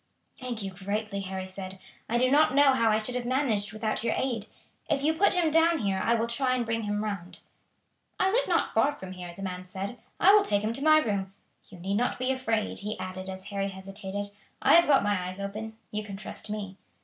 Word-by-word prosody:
"Thank 245 -4 -5
you 195 - -4
greatly," 200 +2 -3
Harry 190 0 -5
said. 185 0 -8 0.3
"I 235 - +2
do 255 +1 +3
not 290 -2 +4
know 285 -1 +6
how 230 -3 +3
I 215 - +4
should 220 +3 -3
have 250 0 -2
managed 240 -6 +1
without 215 0 -2
your 230 - +1
aid. 235 -5 -2 0.4
If 280 -2 +1
you 315 +2 +3
put 370 +4 +4
him 335 -3 +2
down 325 +1 +4
here 200 -7 0
I 235 - +3
will 225 0 +1
try 255 +2 +1
and 245 -2 -1
bring 225 -1 -1
him 205 0 -1
round." 195 -4 -5 0.8
"I 380 - +3
live - - +2
not - - +1
far 285 - +4
from 190 -10 -9
here," 180 -1 -7
the 195 - -8
man 180 -1 -4
said. 195 +6 -5 0.2
"I 390 +3 +7
will 420 - +7
take 205 - +1
him 220 +2 0
to 275 - -5
my 310 0 +7
room. 200 -8 -1 0.3
You 190 - -12
need 195 +3 -1
not 245 +2 0
be 255 +1 0
afraid," 225 -5 -1
he 210 +1 -4
added 185 0 -6
as 190 0 -7
Harry 195 0 0
hesitated, 195 +1 -6 0.3
"I - - +4
have 340 +1 +7
got 280 -6 +5
my 205 -3 0
eyes 185 +2 -5
open, 215 +3 -5
you 210 - -2
can 200 -2 -7
trust 210 - -5
me." 200 -2 -5
215 Hz, 230 wpm, -28 LUFS, 195-255 Hz, 0.8 s, I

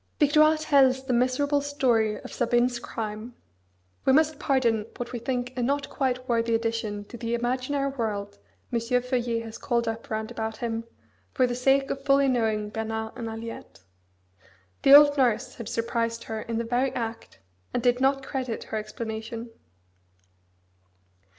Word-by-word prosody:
Victoire 305 +1 +5
tells 270 -4 +3
the 255 - 0
miserable 260 +4 +2
story 240 -7 +1
of - - -10
Sabine's 240 0 +1
crime 220 +1 -6 0.7
we 265 - +4
must 310 +1 +3
pardon 230 -6 +1
what 240 -1 -5
we 245 - -4
think 250 +1 -3
a 250 - -2
not 280 +3 -1
quite 255 -2 -1
worthy 230 -1 +1
addition 225 -3 -2
to 240 - -10
the 235 0 -2
imaginary 255 +4 -1
world 210 - -4 0.3
M. 235 - +2
Feuillet 245 0 0
has 225 -1 -9
called 235 -2 0
up 225 0 -4
round 220 +1 -3
about 220 -2 -4
him, 230 -1 -3 0.5
for 255 - +4
the 245 - -1
sake 270 +2 +2
of 275 - -4
fully 275 0 +4
knowing 220 -4 0
Bernard 220 0 -3
and 235 -2 -5
Aliette. 225 - -8 1.0
The 275 - +9
old 290 0 +8
nurse 240 -5 +2
had 230 -3 -7
surprised 230 0 -1
her 220 -1 -5
in 230 0 -4
the 230 - 0
very 245 +3 0
act, 230 -1 -5 0.3
and 240 - -2
did 245 0 +3
not 270 0 +2
credit 255 -4 -3
her 220 - -4
explanation. 225 +2 -6
240 Hz, 155 wpm, -26 LUFS, 225-265 Hz, 1.0 s, The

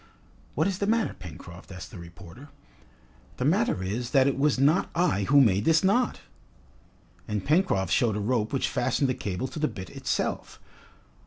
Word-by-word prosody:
"What 155 - +1
is 195 -1 -1
the 200 - -1
matter, 225 0 +1
Pencroft?" 85 +1 -11
asked 90 0 -9
the 100 - -10
reporter. 85 - -12 0.9
"The 125 - -2
matter 170 - +1
is, 115 +6 -3
that 135 -2 +5
it 140 - +1
was 140 0 +1
not 150 +8 +3
I 170 - +1
who 145 +5 +5
made 105 -6 +4
this 160 -1 +4
knot!" 240 +6 +1 1.1
And 105 -2 -3
Pencroft 145 - +1
showed 115 -5 +2
a - - -2
rope 110 +1 -1
which 135 - 0
fastened 140 - 0
the - - +1
cable 100 +2 -4
to - - -7
the 155 - +1
bitt 95 -8 -8
itself. - - -3
130 Hz, 175 wpm, -26 LUFS, 95-155 Hz, 1.1 s, that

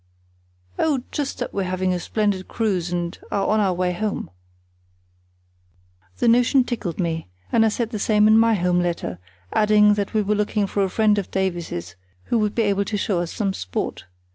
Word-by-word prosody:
"Oh, 280 -6 +1
just 285 -2 -3
that - - -4
we're 195 -1 -1
having 185 0 0
a 180 - -1
splendid 205 -1 -1
cruise, 190 -7 -1
and 175 -1 -2
are 200 -1 0
on 215 - +2
our 190 -3 +2
way 180 0 0
home." 205 - -3 1.9
The - - +1
notion 245 +3 +4
tickled 225 -9 -4
me, 165 - -2 0.2
and 225 - +4
I 220 - +4
said 225 +1 -2
the 215 - -3
same 210 0 +3
in 215 - +6
my 225 0 +5
home 180 -1 +1
letter, 170 - -2 0.3
adding 210 -1 +5
that 205 +1 -3
we 215 - +3
were 205 +1 +1
looking 210 0 0
for 200 +1 0
a 190 - 0
friend 210 +1 +3
of 195 - -5
Davies's 170 - -3 0.3
who 235 - 0
would 210 -1 0
be 230 - +2
able 200 -1 +1
to 210 - -2
show 195 -2 0
us 175 -1 -3
some 195 -3 -1
sport. 90 - -4
205 Hz, 190 wpm, -22 LUFS, 180-215 Hz, 1.9 s, in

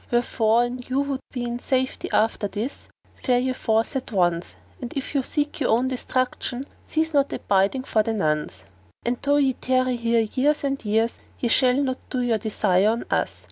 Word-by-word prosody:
Wherefore, 235 -1 +2
an 245 +1 -3
you 265 +2 +1
would 280 -2 -2
be 250 -2 -3
in 240 0 -3
safety 260 0 -1
after 215 -1 +2
this, 220 +7 -5 0.3
fare 250 -1 +1
ye 255 +1 0
forth 225 0 0
at 260 -2 -3
once; 175 -3 +1 0.3
and 245 - -5
if 275 +1 -4
you 280 - +2
seek 295 +3 -2
your 275 - +1
own 245 +4 +3
destruction 255 0 -2 0.2
cease 320 0 -1
not 280 -1 +3
abiding 200 +7 +1
for 220 -4 +2
the 225 +1 -1
nonce; 150 - -1 0.4
and 240 +1 0
though 285 +1 +2
ye 270 -2 +3
tarry 255 0 +1
here 230 0 +2
years 275 +8 +1
and 275 -1 -1
years, 225 +2 +1 0.2
ye 240 - 0
shall 250 +1 +4
not 260 -1 -2
do 255 -1 -1
your 230 -3 +1
desire 205 -2 +2
on 230 +1 -1
us. - - 0
245 Hz, 190 wpm, -24 LUFS, 220-260 Hz, 0.4 s, shall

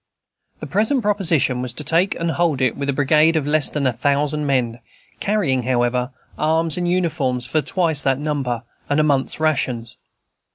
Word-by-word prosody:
The - - -5
present 220 +5 +1
proposition 170 -11 +2
was 125 -1 -4
to 150 - -5
take 165 +6 +1
and 165 0 -1
hold 165 -5 0
it 130 -3 +1
with 140 0 -4
a - - +4
brigade 150 +4 +3
of 155 -3 0
less 150 0 +2
than 150 -2 -2
a 130 - +2
thousand 145 +3 0
men, 120 -4 0 0.4
carrying, 195 -12 0
however, 125 0 0 0.3
arms 160 0 +1
and 175 -1 -1
uniforms 150 -9 -1
for 155 - 0
twice 160 0 +2
that 135 -1 +1
number, 135 -5 -3 0.3
and 145 +1 +1
a - - +4
month's 140 -2 0
rations. 130 -7 -1
145 Hz, 175 wpm, -20 LUFS, 130-165 Hz, 0.4 s, a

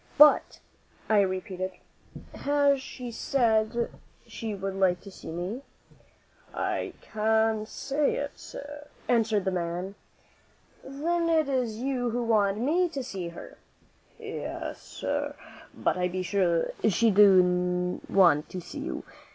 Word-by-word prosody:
"But," 295 +1 +6 0.5
I 215 -2 +5
repeated, 185 -1 -2 0.6
"has 285 -1 +2
she 250 -2 -7
said 230 -2 +1 0.3
she 220 -2 -5
would 195 0 -4
like 190 -2 +2
to 200 - -11
see - - -10
me?" 180 +9 -4 0.9
"I - - -2
can't 220 0 +1
say 280 +4 -1
it, 285 0 -3
sir," 290 +1 -9 0.2
answered 220 -4 +2
the 190 - +1
man. 175 +2 -3 0.9
"Then 335 +5 -1
it 320 -3 +3
is 250 -5 -1
you 255 -3 0
who 240 +1 -1
want 210 -3 +2
me 330 +10 +2
to 275 -5 -4
see 190 -8 -5
her?" 170 - -10 0.6
"Yes, - - -6
sir; - - -3 0.4
but - - -1
I 180 - +2
be 185 +1 -3
sure 175 -2 +1 0.2
she 225 +3 +3
do 180 -2 +4
want 175 -6 +4
to 185 - -5
see 175 - -8
you. - - -4
215 Hz, 130 wpm, -28 LUFS, 185-265 Hz, 0.9 s, But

